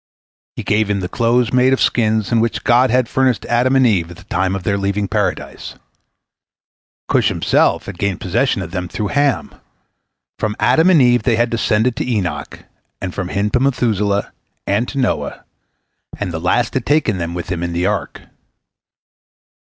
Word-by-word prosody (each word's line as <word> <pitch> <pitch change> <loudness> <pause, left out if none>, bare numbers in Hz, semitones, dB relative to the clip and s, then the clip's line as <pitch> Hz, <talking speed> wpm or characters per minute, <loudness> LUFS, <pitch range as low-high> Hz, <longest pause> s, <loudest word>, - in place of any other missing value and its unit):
He - - -5
gave 105 0 +1
him 100 -1 0
the 90 - -3
clothes 120 +5 +1
made 130 +1 +4
of 135 - 0
skins 110 -3 +1
with 115 - +3
which 115 0 -1
God 125 +2 +4
had 125 0 +2
furnished 130 -4 0
Adam 125 +3 +2
and 130 -1 +4
Eve 95 -8 +1
at 85 - -11
the - - -14
time 95 +1 -1
of 95 - -5
their 100 0 0
leaving 100 +1 -1
Paradise. - - -3 1.3
Cush - - +2
himself - - +1
had 95 -3 -8
gained 100 -2 -1
possession 95 +3 0
of 85 - -8
them 90 -1 -3
through 105 +3 -4
Ham. 140 -1 0 0.9
From 105 -1 -1
Adam 160 +3 +4
and 165 -7 +5
Eve 120 0 +4
they 120 -3 +1
had 120 +2 +1
descended 115 +1 +1
to - - -2
Enoch, 90 -10 -3 0.3
and 90 -2 -5
from 95 -3 -3
him 100 +3 -1
to 125 - +2
Methuselah, 105 -6 0 0.3
and 105 +5 0
to 140 - -7
Noah, 80 - -2 0.7
and 105 -3 -3
the 80 - -4
last 115 +7 +1
had 130 - -2
taken 135 -10 +1
them 85 0 -4
with 90 0 -5
him 85 -2 -2
into 85 0 -3
the 85 +1 -1
ark. - - -2
105 Hz, 185 wpm, -18 LUFS, 95-125 Hz, 1.3 s, and